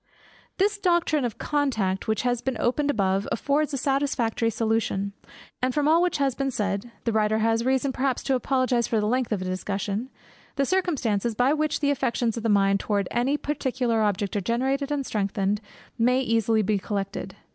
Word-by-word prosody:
This 410 +2 +1
doctrine 345 -7 +2
of 235 - -4
contact 225 -11 -1
which 220 +2 0
has 245 -1 0
been 265 -2 -2
opened 285 +4 +1
above, 195 -5 +1
affords 285 +6 +1
a 275 - -2
satisfactory 270 -4 0
solution; 220 -3 -1 0.5
and 255 0 0
from 295 -1 +2
all 325 +2 +5
which 360 -2 +1
has 275 -2 +1
been 275 +2 -1
said 205 -2 -2
(the 230 - 0
writer 215 0 +2
has 225 +1 +1
reason 265 +2 +1
perhaps 260 -1 -1
to 270 - 0
apologize 255 -2 +1
for 225 - +1
the 210 - 0
length 250 +2 0
of 210 - +1
the - - -3
discussion) 200 +5 -3 0.5
the 275 - +1
circumstances, 245 - 0
by 250 +5 +3
which 310 0 0
the 285 -1 +3
affections 245 -4 0
of 230 - -4
the 225 - -1
mind 200 -1 +3
towards 200 -2 -1
any 255 +5 +1
particular 260 -6 -1
object 205 -1 0
are 205 - +1
generated 265 +7 -1
and 285 -2 -1
strengthened, 200 -1 -1 0.4
may 250 +3 +3
be 240 -3 -1
easily 220 -2 +2
collected. 195 0 -4
240 Hz, 185 wpm, -25 LUFS, 210-275 Hz, 0.5 s, all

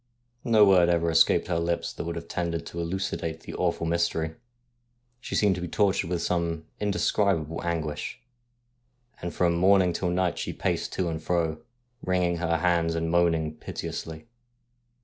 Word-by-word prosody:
No 110 -4 +6
word 90 -3 +5
ever 85 -1 +2
escaped 80 - +4
her 85 -2 0
lips 85 0 -1
that - - -6
would 85 - -3
have 85 0 -6
tended 85 -2 -2
to 85 - -7
elucidate 85 -2 -3
the - - -9
awful - - -1
mystery. 80 -1 0 0.9
She - - -5
seemed 105 -2 +4
to 90 - -5
be 90 - -3
tortured 95 -1 +1
with 85 -2 -1
some 85 -2 -1
indescribable 100 -5 0
anguish, 80 -3 -3 1.0
and 85 - -3
from 85 -1 +2
morn 95 +3 +5
ing 90 -1 0
till 90 - -1
night 90 -1 0
she - - -3
paced - - -2
to 90 - -1
and 80 -1 -3
fro, 80 -2 0 0.4
wringing 90 -1 +1
her 85 -1 0
hands 85 -1 +1
and 80 0 -1
moaning 80 -3 +2
piteously. 80 0 -6
85 Hz, 165 wpm, -27 LUFS, 80-90 Hz, 1.0 s, No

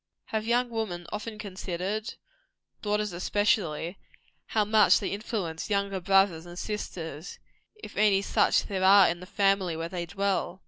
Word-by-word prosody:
Have 220 0 -1
young 240 +1 +1
women 200 -7 -3
often 215 +1 -5
considered 200 +1 -4 0.7
daughters, 210 -2 -1
especially 180 -2 0 0.5
how 215 -2 +1
much 215 0 +5
they - - -3
influence 200 -6 -4
younger 200 -1 0
brothers 185 -3 +2
and 175 0 -10
sisters, 170 -6 -5 0.4
if 425 - -11
any 200 -2 +3
such - - +3
there 190 -2 -3
are 195 0 +7
in 170 - -1
the 180 - -10
family 195 -4 +1
where 165 +1 -4
they 175 -1 -4
dwell? 195 0 -1
195 Hz, 145 wpm, -28 LUFS, 175-210 Hz, 0.7 s, are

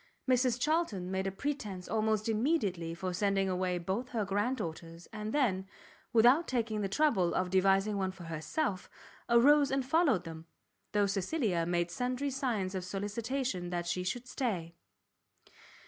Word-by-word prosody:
Mrs 250 -1 +2
Charlton 250 - 0
made 190 0 -1
a - - -1
pretence 210 -6 -4
almost 215 +1 0
immediately 210 - 0
for 185 +1 -3
sending 195 +1 +1
away 185 -1 0
both 190 +9 -3
her 220 -4 -1
grand 205 +7 0
daughters, 165 -3 -7
and 215 0 -4
then, 200 -10 +1 0.4
without 245 +9 +5
taking 225 -4 -1
the 195 - -1
trouble 195 - +2
of 185 -1 0
devising 195 +2 +3
one 190 -1 0
for 185 -2 -12
herself, 170 - -3 0.4
arose 280 +5 +6
and 270 -1 0
followed 295 - +3
them, 165 -1 -9 0.5
though 205 -1 +3
Cecilia 195 - 0
made 175 0 0
sundry 250 +6 -2
signs 235 -9 -1
of 185 -1 -3
solicitation 205 +1 -3
that 175 -1 -2
she 180 +1 -1
would 245 0 -10
stay. 185 -12 -2
205 Hz, 150 wpm, -32 LUFS, 185-250 Hz, 0.5 s, arose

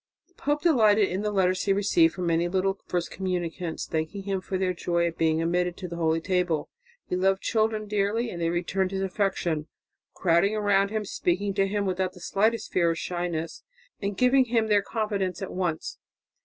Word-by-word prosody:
The - - -33
pope 295 -3 -1
delighted 220 - +4
in 185 +2 -2
the 210 - -1
letters 185 -2 +1
he 195 - +3
received 180 -5 +3
from 180 - -3
many 170 0 +2
little 195 +2 0
first 175 -1 -2
communicants 175 -3 -3
thanking 160 +5 -3
him 195 -1 -2
for 190 0 -3
their 185 -1 0
joy 170 0 0
at 170 -1 -2
being 160 0 +1
admitted 175 +1 0
to 185 - -6
the 170 -1 -6
holy 165 -1 +1
table; 180 -3 -1 0.3
he - - -2
loved 190 +1 +1
children 220 -1 0
dearly 210 +3 0
and 170 - -6
they 165 - +1
returned 180 +2 0
his 195 0 -2
affection, 180 -5 -1 0.5
crowding 185 +4 +2
round 200 -2 +2
him, 215 0 -2
speaking 195 +1 -1
to 195 0 +2
him 205 0 -1
without 185 0 -1
the - - -14
slightest 215 +5 0
fear 170 -2 +3
or 165 - 0
shyness, 170 -1 -3 0.4
and 200 -1 -3
giving 255 +1 +4
him 225 -2 +1
their 205 -1 +4
confidence 200 -3 -2
at 190 - -5
once. 175 -4 -3
190 Hz, 195 wpm, -26 LUFS, 175-205 Hz, 0.5 s, delighted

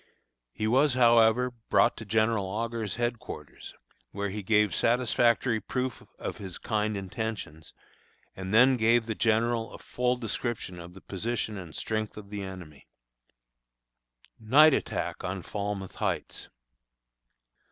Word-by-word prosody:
He 110 - -3
was, 130 +4 +3
however, 120 0 +5 0.2
brought 115 - +4
to 115 - -8
General 110 -1 +1
Augur's 110 0 -3
headquarters, 120 0 -5 0.3
where 100 0 -3
he 105 +2 -4
gave 105 -2 +2
satisfactory 120 0 +2
proof 125 +3 -3 0.2
of - - -5
his 95 -4 -6
kind 105 -1 -1
intentions, 95 -6 -5 0.6
and 95 0 -6
then 125 +4 +6
gave 115 +1 +3
the 110 - -2
General 115 +1 +1
a - - -9
full 125 0 -1
description 115 -5 -4
of 85 +1 -11
the 95 - -12
position 110 +2 -3
and 90 -5 -8
strength 110 -1 -3
of 100 -1 -10
the 105 -1 -4
enemy. 90 -7 -9 1.5
NIGHT 140 +8 +6
ATTACK - - -2
ON - - -4
FALMOUTH 100 -2 -4
HEIGHTS. - - -3
110 Hz, 130 wpm, -28 LUFS, 100-120 Hz, 1.5 s, then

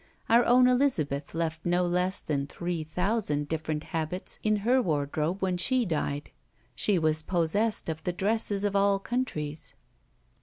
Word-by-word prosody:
Our 235 +1 +6
own 250 +1 +6
Elizabeth 165 - +1
left 165 -1 -2
no 175 +1 +2
less 180 +2 0
than 140 -2 -1
three 170 +2 -3
thousand 175 -3 -1
different 155 -1 -3
habits 165 +3 -4
in 215 0 +2
her 255 +2 +4
wardrobe 155 - -1
when 185 -1 +1
she 255 +6 +1
died. 150 -4 -2 0.4
She 195 - +2
was 155 -1 +2
possessed 185 +7 0
of 160 -1 -3
the 180 - -1
dresses 205 +2 -1
of 205 -1 0
all 200 0 +4
countries. 160 - -4
175 Hz, 150 wpm, -28 LUFS, 155-205 Hz, 0.4 s, Our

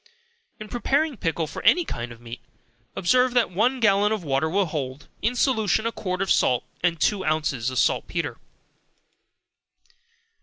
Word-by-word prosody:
In 215 - -8
preparing 280 +6 0
pickle 165 -5 -1
for 155 - -7
any 350 -1 +4
kind 120 - -5
of 115 - -12
meat, 120 0 -9 0.6
observe 250 +6 +2
that 240 -5 +3
one 245 +8 +1
gallon 205 -2 +3
of 215 -4 -2
water 140 +1 0
will 195 +3 +1
hold, 145 -3 -5
in 235 +3 0
solution, 220 -4 +1
a 230 - 0
quart 185 -3 -3
of 195 - -1
salt 125 -1 +3 0.2
and 170 -2 +1
two 200 +2 +1
ounces 150 -7 0
of 130 - -5
saltpetre. 130 - 0
190 Hz, 155 wpm, -24 LUFS, 150-230 Hz, 0.6 s, any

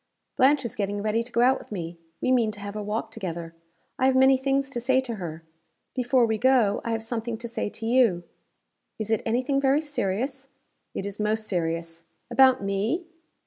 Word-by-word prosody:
"Blanche 270 0 +4
is 235 - -4
getting 205 -3 -2
ready 215 +1 +1
to 240 +2 -8
go 235 +1 +2
out 260 +2 +4
with - - -15
me. 170 -4 -5 0.2
We 255 - +1
mean 240 -4 +3
to 210 - -11
have 200 0 -6
a 210 - -3
walk 215 +2 -3
together. 170 -6 -5 0.5
I 260 - +4
have 265 - +3
many 265 +1 +6
things 270 +1 0
to 240 - -3
say 260 +2 +3
to 240 -4 -4
her. 165 -3 -6 0.5
Before 250 -1 +3
we 220 -1 -1
go, 245 -4 +3
I - - -4
have 225 -1 -1
something 230 0 -3
to 235 +1 -7
say 230 -2 -3
to 225 - -8
you." 230 -7 +3 0.7
"Is 220 0 -4
it 220 - +2
any 240 +3 +1
thing 275 +1 +1
very 275 +1 +4
serious?" 270 -1 -3 0.5
"It 195 - -3
is 200 +1 -6
most 215 +1 0
serious." 165 -2 -3 0.3
"About 260 -2 +5
me?" 205 - -1
225 Hz, 205 wpm, -26 LUFS, 200-260 Hz, 0.7 s, many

